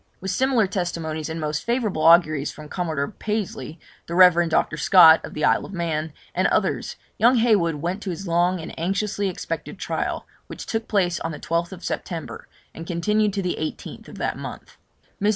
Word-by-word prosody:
With 190 0 -3
similar 255 0 +2
testimonies 165 -5 -3
and 160 +1 -4
most 150 -1 -2
favourable 230 -9 -1
auguries 155 -4 +4
from 150 -1 -11
Commodore 160 -6 -2
Pasley, 195 - -4 0.3
the 170 - -4
Rev. 175 -2 +6
Dr. 155 - +1
Scott, 160 0 +7
of - - -8
the 150 - 0
Isle - - +3
of 200 - -9
Man, 160 -3 -2 0.2
and - - +2
others, - - 0 0.2
young 240 +3 +5
Heywood 210 -9 +3
went 175 +7 -3
to 200 - -5
his 185 +2 -5
long 175 +2 +2
and 160 - -7
anxiously 200 +3 -1
expected 185 - -5
trial, - - -3 0.2
which - - -8
took 225 0 -3
place 180 -5 +1
on 165 - -3
the 150 - -7
12th 170 +2 -3
September, 165 -3 -5 0.3
and 165 +1 -9
continued 210 +4 +1
to 195 -1 -2
the 180 - -2
18th 155 - -6
of - - -11
that - - -2
month. - - -9 0.5
Mrs. 205 - +3
175 Hz, 185 wpm, -23 LUFS, 160-200 Hz, 0.5 s, Scott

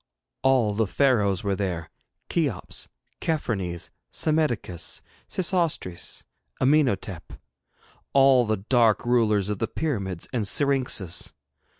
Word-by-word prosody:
All 125 -6 +3
the 110 +1 +1
Pharaohs 105 -6 +2
were 100 -1 0
there 90 -4 -3 0.4
Cheops, 145 - -2 0.3
Chephrenes, 95 - -2 0.2
Psammetichus, 150 - 0 0.3
Sesostris, 170 - -1 0.4
Amenotaph 130 - +1 0.7
all 135 -2 +5
the 110 0 +1
dark 115 +2 +2
rulers 110 -5 +2
of 105 - -3
the 115 - 0
pyramids 100 - -3
and 115 -4 0
syrinxes. 125 - +1
115 Hz, 95 wpm, -25 LUFS, 95-135 Hz, 0.7 s, all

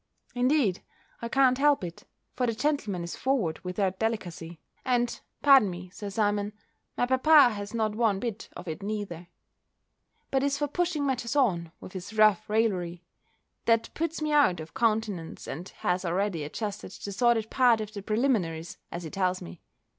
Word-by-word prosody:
Indeed, 250 - +2 0.4
I 235 - -4
can't 260 0 +4
help 290 -5 +4
it: 170 -1 -7 0.3
for 250 -1 0
the 230 - -1
gentleman 225 - -1
is 170 - -5
forward 235 -12 0
without 185 +1 -2
delicacy; 175 -7 -3 0.2
and 240 -1 0 0.2
(pardon 270 -8 +7
me, 180 0 -8
Sir 200 +1 -6
Simon) 205 0 0 0.4
my - - +2
papa 260 +1 +6
has 205 +1 -6
not 220 -2 0
one 215 -3 +1
bit 225 -1 -5
of - - -9
it 160 -1 -5
neither; 195 -5 -4 1.0
but 270 - +2
is 280 0 +1
for 290 - 0
pushing 330 -1 -1
matters 255 -2 -1
on, 175 - +2
with - - -11
his 190 +3 -7
rough 215 -3 +4
raillery, 185 -6 0 0.6
that 230 -1 +2
puts 325 -1 -2
me 305 - 0
out 285 - +4
of 160 0 -9
countenance, 215 -7 -1
and 180 +3 -6
has 180 +1 -1
already 180 -1 -1
adjusted 205 +7 -5
the 200 - -7
sordid 225 0 +2
part 245 -4 +4
of 215 0 -5
the 200 - -6
preliminaries, 200 -8 -1
as 170 +1 -5
he 160 - -7
tells 185 -1 0
me. 85 0 -10
215 Hz, 170 wpm, -28 LUFS, 180-250 Hz, 1.0 s, pardon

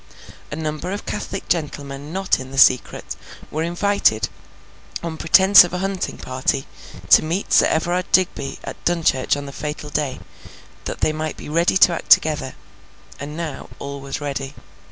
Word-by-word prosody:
A - - -3
number 155 +3 -4
of 205 - -5
Catholic 195 - -5
gentlemen 145 -3 -3
not 190 -3 0
in 130 0 -8
the 135 - -9
secret, 130 -1 +3 0.4
were 155 - -2
invited, 175 - +1 0.7
on 165 -1 -4
pretence 190 +5 +7
of 175 - -5
a - - -1
hunting 195 0 -3
party, 130 +1 -2 0.5
to - - +9
meet 170 +5 -2
Sir - - +6
Everard 175 +3 -1
Digby 185 -6 +1
at - - -8
Dunchurch 160 -6 +1
on 145 - -6
the 140 - -8
fatal 150 0 -6
day, 145 -3 -2 0.7
that - - -5
they 155 - +2
might 155 0 -4
be - - -9
ready 170 +4 +2
to 180 - +6
act - - -6
together. 150 -4 +4 0.6
And 150 +2 -7
now 165 -4 -6
all 140 0 -7
was 135 +1 -5
ready. 140 -1 -5
155 Hz, 165 wpm, -21 LUFS, 140-175 Hz, 0.7 s, to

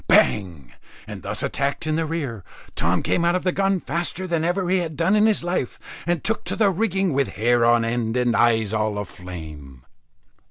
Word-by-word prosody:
Bang! 80 - +2 0.3
and - - -8
thus - - -4
attacked 140 +2 -1
in 155 0 0
rear, 155 - -3 0.3
Tom - - +1
came 170 - +1
out 170 +1 +3
of 185 - -1
the 185 - +2
gun 195 0 +1
faster 170 +4 -3
than 170 -3 -1
ever 175 +2 0
he 185 +1 +2
had 160 -4 -4
done 170 +6 +3
in 215 +1 +5
his 215 -5 +1
life, 175 -8 -2 0.3
and 175 -2 0
took 225 - 0
to - - -2
the 210 -3 +3
rigging, 190 -2 0
with 140 0 0
hair 120 +4 +2
on 120 0 +4
end 115 0 -1
and 120 -2 +2
eyes 110 -3 +3
all 110 -1 0
a 105 - -3
flame. 75 -9 -10
140 Hz, 200 wpm, -23 LUFS, 110-180 Hz, 0.3 s, in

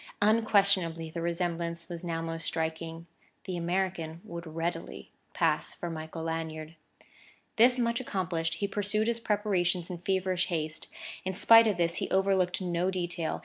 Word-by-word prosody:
Unquestionably 200 -7 +3
the 170 - -4
resemblance 170 -1 -2
was 170 0 -6
now 165 -1 -2
most 165 0 -4
striking; 165 0 -3 0.4
the 185 - -3
American 175 -2 -1
would 170 -5 -7
readily 165 - -4 0.2
pass - - +1
for 175 - -5
Michael 160 0 -6
Lanyard. 160 -1 -4 0.8
This 245 +3 +6
much 235 0 +1
accomplished, 175 -7 -2
he 200 - -1
pursued 205 +2 0
his 235 0 0
preparations 190 -5 0
in 175 - -5
feverish 185 0 0
haste. 155 -2 -3 0.4
In 190 0 -3
spite 225 +3 +8
of 205 -4 +1
this, 170 -1 +1
he - - -2
overlooked 190 -1 +2
no 175 +1 0
detail. 175 -3 -2
175 Hz, 145 wpm, -30 LUFS, 165-195 Hz, 0.8 s, spite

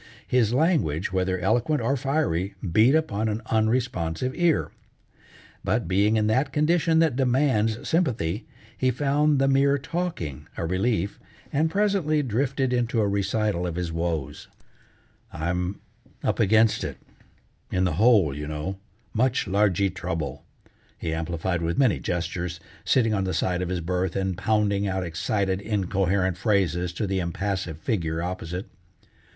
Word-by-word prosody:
His 120 -4 +2
language, 120 - +1
whether 95 0 +1
eloquent 120 - +1
or 135 - +1
fiery, 125 - -1
beat 110 - +4
upon 110 -9 0
an 110 +1 -3
unresponsive 110 -2 0
ear. 175 -3 +2 0.9
But 110 +4 0
being 100 +4 +3
in 105 - +2
that 130 +6 +1
condition 160 +2 +2
that 160 -5 +3
demands 125 -4 +1
sympathy, 120 - 0 0.3
he 130 - +1
found 145 +3 +2
the 135 0 +3
mere 140 +1 +4
talking 135 - -4
a 85 - -2
relief, 100 +2 0 0.3
and 155 +3 +2
presently 190 -6 +1
drifted 130 +2 0
into 120 -1 0
a 105 - +2
recital 100 -2 0
of 85 - -4
his 90 -1 -3
woes. 80 -4 -3 0.8
"I'm 90 +4 -2 0.4
up - - 0
against 110 +2 +4
it, - - -4 0.7
in 90 - +1
the 90 -3 +1
hole, 105 - +5
you 75 +1 -5
know, 75 +6 -4 0.3
much 130 +3 +1
largee 100 -1 +2
trouble," 85 -7 -4 0.5
he 80 - -3
amplified 85 +2 -2
with 85 0 -1
many 130 -6 +3
gestures, 85 0 -3 0.2
sitting 115 -4 +2
on 100 -2 0
the 95 - -1
side 90 -1 0
of 90 - -2
his 90 -2 -2
berth, 90 +1 -1
and 95 -1 -1
pounding 100 0 +1
out 95 -1 -1
excited, 95 +3 -1
incoherent 95 -3 0
phrases 90 -4 +1
to 105 - -2
the 95 -1 -1
impassive 90 -1 -2
figure 80 -4 -2
opposite. 90 0 -4
100 Hz, 145 wpm, -25 LUFS, 90-125 Hz, 0.9 s, hole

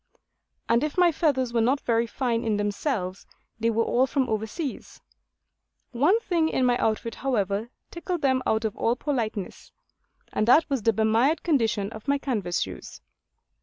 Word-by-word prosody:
And 235 +3 +3
if 300 +2 -3
my 355 -1 +5
feathers 260 -6 0
were 230 - +2
not 260 +5 +2
very 230 0 +1
fine 235 -1 -1
in 220 -2 0
themselves, 205 -2 -2 0.3
they 230 +1 +1
were 230 0 +1
all 250 +3 +2
from 265 0 0
over 220 0 -1
seas. 285 +3 -6 0.9
One 295 - +3
thing 335 -6 +1
in 260 - +1
my 245 -1 +3
outfit, 220 +1 -1
however, 215 -4 -1 0.2
tickled 345 -1 -4
them 260 -1 +2
out 220 +1 +1
of 215 - -2
all 235 - +1
politeness; 230 -8 -4 0.6
and 215 - 0
that 310 +7 +6
was 270 -4 0
the 225 - +3
bemired 225 +8 +2
condition 225 - +1
of 220 +3 -10
my 280 0 +3
canvas 210 -11 -2
shoes. - - -6
235 Hz, 165 wpm, -26 LUFS, 220-280 Hz, 0.9 s, that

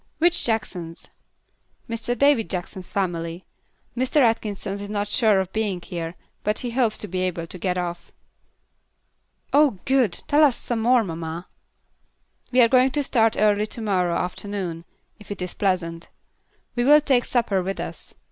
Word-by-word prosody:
"Which 345 +1 +3
Jacksons?" 185 -7 -3 0.8
"Mr. 230 +1 -2
David 280 -5 +3
Jackson's 180 0 -5
family. 170 -2 -2 0.5
Mr. 255 +4 +1
Atkinson 215 -5 0
is 200 0 -6
not 205 0 -1
sure 210 -1 +3
of 190 -1 -3
being 210 -4 -1
here, 170 -1 -6 0.3
but 210 +1 0
he 245 - -3
hopes 230 -3 +1
to 210 - -4
be 185 0 -3
able 175 -2 -2
to 175 - -6
get 180 +1 -1
off." 175 -1 -4 1.4
"Oh, 285 -7 +4
good! 260 -6 +3 0.2
Tell 295 +2 +4
us 280 -5 +4
some 235 -2 -2
more, 240 +1 +4
mamma." 165 -1 -5 1.0
"We 250 0 +5
are 235 - +7
going 255 +2 +4
to 290 - +1
start 225 -4 +2
early 210 0 +3
to 230 - -7
morrow 180 -5 +1
afternoon, 180 -2 -3 0.3
if 210 - -15
it 205 - -5
is 180 -1 -4
pleasant. 170 -4 -1 0.7
We 240 - +1
will 295 +4 +7
take 265 -4 +2
supper 225 -6 +1
with 195 +2 -4
us. - - -7
205 Hz, 160 wpm, -23 LUFS, 180-240 Hz, 1.4 s, are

